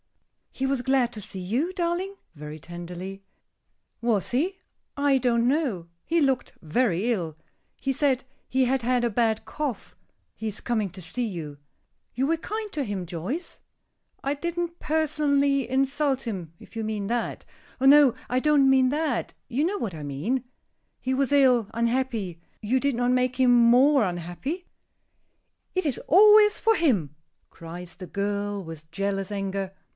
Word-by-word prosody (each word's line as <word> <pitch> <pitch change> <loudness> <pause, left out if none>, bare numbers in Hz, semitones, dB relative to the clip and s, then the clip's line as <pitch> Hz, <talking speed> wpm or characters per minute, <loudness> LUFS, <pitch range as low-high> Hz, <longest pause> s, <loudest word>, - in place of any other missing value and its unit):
"He 265 - -2
was 270 -2 0
glad 250 -1 +2
to 215 - -7
see 190 - -7
you, 240 - -1
darling?" 360 +2 -1 0.2
very 150 +1 -8
tenderly. 175 +4 -8 0.8
"Was 230 -5 0
he? 340 +10 0 0.4
I 280 -1 +3
don't 235 -1 +2
know. 255 - 0 0.2
He 335 +1 +2
looked 270 -4 +1
very 200 +5 +1
ill. 165 -7 -4 0.4
He 270 - -1
said 265 -2 +1 0.3
he 260 0 +2
had 260 +1 +1
had 245 +1 +1
a 240 - +2
bad 225 0 +1
cough. 285 -8 -4 0.4
He 220 - -5
is 210 -1 -2
coming 220 -4 -1
to 185 +1 -10
see 240 +9 -3
you." 160 -8 -6 0.6
"You 260 +3 +1
were 330 - +3
kind 425 +5 -5
to 295 - -1
him, 200 -6 -3
Joyce?" 185 - -5 0.6
"I 275 - 0
didn't 340 +3 -3
personally 285 -4 +1
insult 270 +1 +1
him, 185 -9 -5
if - - -16
you 225 - -2
mean 215 -2 -2
that." 235 +1 -2 0.3
"Oh, 265 - 0
no, 280 -2 +8 0.2
I 250 - +2
don't 285 -1 +4
mean 260 -1 +5
that, 295 -2 -1
you 260 +4 0
know 385 +5 0
what 220 - -3
I 155 - -7
mean. 155 - -2 0.6
He 260 - -1
was 275 +1 +1
ill, 255 -6 +4
unhappy; 230 -7 -1 0.2
you 245 +5 +1
did 280 -1 0
not 245 +1 +1
make 255 0 +1
him 255 -1 +5
more 245 +3 +6
unhappy?" 180 - -4 1.1
"It 370 -2 0
is 280 -5 0
always 420 +4 +7
for 450 0 +3
him!" 200 - +1 0.4
cries 170 +1 -9
the 185 - -9
girl, 205 0 -2
with 160 -2 -9
jealous 195 +1 -2
anger. 195 -1 -3
245 Hz, 160 wpm, -26 LUFS, 195-280 Hz, 1.1 s, no